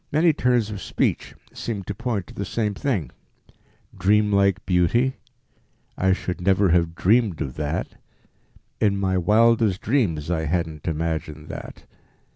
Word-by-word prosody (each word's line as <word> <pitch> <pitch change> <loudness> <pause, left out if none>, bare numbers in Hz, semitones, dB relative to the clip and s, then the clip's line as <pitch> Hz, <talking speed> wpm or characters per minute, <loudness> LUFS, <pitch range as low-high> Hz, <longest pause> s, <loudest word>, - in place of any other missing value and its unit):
Many 160 +2 +4
turns 125 -6 +1
of 100 -3 -6
speech - - -1 0.2
seem 105 -4 -4
to 100 - -5
point 110 -3 -3
to - - -14
the 100 - -4
same 105 +2 -1
thing 100 - -2 0.8
"dreamlike 100 -1 +2
beauty," 100 +9 +2 0.8
"I 95 0 +2
should 90 -1 -2
never 95 +1 +3
have 85 -1 +2
dreamed 105 -3 +2
of 65 - -3
that," 75 +1 -3 0.8
"in 100 -2 +2
my 95 -1 0
wildest 110 +1 +3
dreams 90 - 0
I 80 -2 0
hadn't 80 -2 -2
imagined 80 -1 -3
that." - - -9
95 Hz, 135 wpm, -23 LUFS, 85-110 Hz, 0.8 s, Many